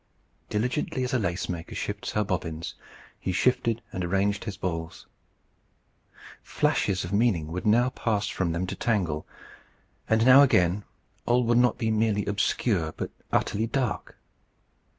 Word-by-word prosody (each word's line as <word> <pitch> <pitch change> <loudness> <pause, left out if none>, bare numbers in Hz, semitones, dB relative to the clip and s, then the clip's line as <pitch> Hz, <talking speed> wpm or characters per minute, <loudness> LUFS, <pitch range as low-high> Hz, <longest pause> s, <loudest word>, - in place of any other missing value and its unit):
Diligently 125 +3 -1
as 125 +2 -2
a 130 - +3
lace 90 -3 -2
maker 85 -1 -5
shifts 105 -1 -4
her 105 - +2
bobbins, 85 -4 -3 0.5
he 95 - -2
shifted 115 +3 +1
and 90 - -3
arranged 100 +3 0
his 100 -3 -5
balls. 85 -3 -4 1.4
Flashes 95 -1 0
of 85 +3 -5
meaning 100 -8 +1
would 90 +4 -3
now 120 +4 +4
pass 105 -5 -1
from 90 -4 -1
them 85 +2 -1
to - - -5
Tangle, 90 -10 -1 0.8
and 110 +1 +3
now 130 +2 +9
again 95 -7 +3 0.4
all 125 +1 +3
would 120 0 +3 0.2
be 115 -2 -1
not - - +1
merely 105 -2 +1
obscure, 100 -4 0
but - - -4 0.2
utterly 110 +3 +1
dark. 115 -3 -2
105 Hz, 145 wpm, -27 LUFS, 90-115 Hz, 1.4 s, now